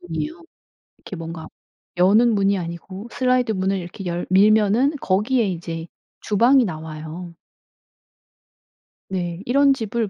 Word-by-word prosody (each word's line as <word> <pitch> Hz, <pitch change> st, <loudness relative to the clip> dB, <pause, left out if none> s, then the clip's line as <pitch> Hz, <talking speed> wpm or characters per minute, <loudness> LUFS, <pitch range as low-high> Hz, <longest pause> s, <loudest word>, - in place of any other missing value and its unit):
문이요. 175 Hz, -, -5 dB, 0.6 s
이렇게 190 Hz, -, -9 dB
뭔가 165 Hz, -1 st, -7 dB, 0.5 s
여는 215 Hz, +6 st, +4 dB
문이 200 Hz, 0 st, +2 dB
아니고 180 Hz, +5 st, -7 dB
슬라이드 250 Hz, -2 st, +1 dB
문을 190 Hz, 0 st, 0 dB
이렇게 180 Hz, +2 st, -8 dB
열 175 Hz, 0 st, -3 dB
밀면은 215 Hz, +7 st, +4 dB
거기에 215 Hz, +4 st, +1 dB
이제 165 Hz, -2 st, -5 dB, 0.3 s
주방이 240 Hz, +5 st, +4 dB
나와요. 160 Hz, 0 st, -7 dB, 1.8 s
네. 175 Hz, -2 st, -3 dB
이런 275 Hz, +2 st, +4 dB
집을 225 Hz, -3 st, -2 dB
195 Hz, 260 characters per minute, -22 LUFS, 170-230 Hz, 1.8 s, 여는